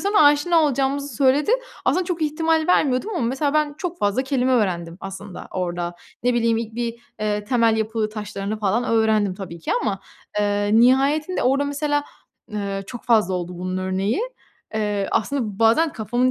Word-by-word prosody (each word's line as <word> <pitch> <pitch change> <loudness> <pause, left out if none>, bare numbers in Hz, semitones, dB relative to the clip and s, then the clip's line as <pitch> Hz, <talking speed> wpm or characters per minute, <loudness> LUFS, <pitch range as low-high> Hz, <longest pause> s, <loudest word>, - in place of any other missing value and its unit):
sonra 405 +1 +3
aşina 295 +4 +5
olacağımızı 275 -2 0
söyledi. 275 - +3 0.3
Aslında 370 - +2
çok 350 -2 -3
ihtimal 320 +1 +1
vermiyordum 290 +1 +2
ama - - -1
mesela 280 +4 0
ben 300 -1 +1
çok 355 0 -4
fazla 205 +5 +1
kelime 260 -1 +1
öğrendim 175 -8 0
aslında 195 0 -8
orada. 175 -1 -3 0.3
Ne 245 0 +2
bileyim 230 -1 +2
ilk 225 -1 -5
bir, 235 -1 -2 0.3
eee, 210 -1 -1
temel 230 -1 +3
yapı 220 0 -1
taşlarını 210 -1 -5
falan 215 +3 +1
öğrendim 220 -4 +2
tabii 185 -3 -8
ki - - -2
ama, 195 -3 -1 0.4
eee, 205 0 +1
nihayetinde 280 +7 +3
orada 270 +3 +2
mesela, 290 0 0 0.4
eee, 200 -2 -3
çok 240 - -8
fazla 215 -6 +3
oldu 175 0 -4
bunun 185 +1 -3
örneği. 190 - -1 0.5
Eee, 205 -2 -1
aslında 220 -4 -1
bazen 230 +8 +4
kafamın 245 +3 0
230 Hz, 160 wpm, -22 LUFS, 205-285 Hz, 0.5 s, aşina